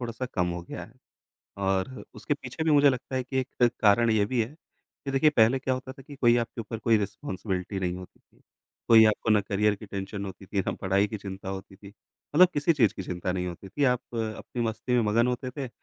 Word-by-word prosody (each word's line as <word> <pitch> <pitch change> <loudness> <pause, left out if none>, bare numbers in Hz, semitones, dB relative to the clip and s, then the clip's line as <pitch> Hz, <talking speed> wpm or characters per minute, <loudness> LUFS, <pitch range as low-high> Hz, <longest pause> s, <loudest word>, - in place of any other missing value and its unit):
थोड़ा-सा 120 +1 -4
कम 90 -3 +1
हो 85 0 -4
गया - - -7
है। - - -18 0.7
और 95 +6 -1
उसके 145 - -2
पीछे 140 +2 -6
भी 160 - +2
मुझे 145 -1 +6
लगता 130 0 -5
है 130 - 0
कि 130 +1 -3
एक 125 -2 +1
कारण 115 +2 +5
ये 110 -2 +3
भी 125 +2 0
है 120 +7 -7 0.5
कि 140 - -3
देखिए 135 +3 +4
पहले 120 -1 +4
क्या 130 0 -1
होता 130 +1 -6
था 135 - -14
कि 140 +2 -12
कोई 120 -3 +4
आपके 120 0 -2
ऊपर 115 +1 -6
कोई 115 +1 +3
रिस्पॉन्सिबिलिटी 95 -1 -4
नहीं 90 -1 -1
होती 90 0 -12
थी। - - -31 0.5
कोई 110 -1 +8
आपको 110 +1 +2
ना 105 - +5
करियर 105 +1 +1
की 105 +1 -11
टेंशन 100 +1 -5
होती 95 0 -9
थी 100 +1 -1
ना, - - 0
पढ़ाई 100 +2 +1
की 110 - -5
चिंता 95 -1 -7
होती 95 0 -7
थी। 100 0 -13 0.5
मतलब 180 +3 +8
किसी 145 +3 +3
चीज़ 120 - +3
की - - -5
चिंता 90 0 -3
नहीं 90 0 -2
होती 90 +2 -7
थी 145 +9 -1
आप 125 -2 +3
अपनी 115 +1 -3
मस्ती 115 +2 -2
में 120 - +4
मगन 115 +3 +3
होते 125 +1 -2
थे, 135 -1 -5
110 Hz, 235 wpm, -27 LUFS, 100-130 Hz, 0.7 s, कोई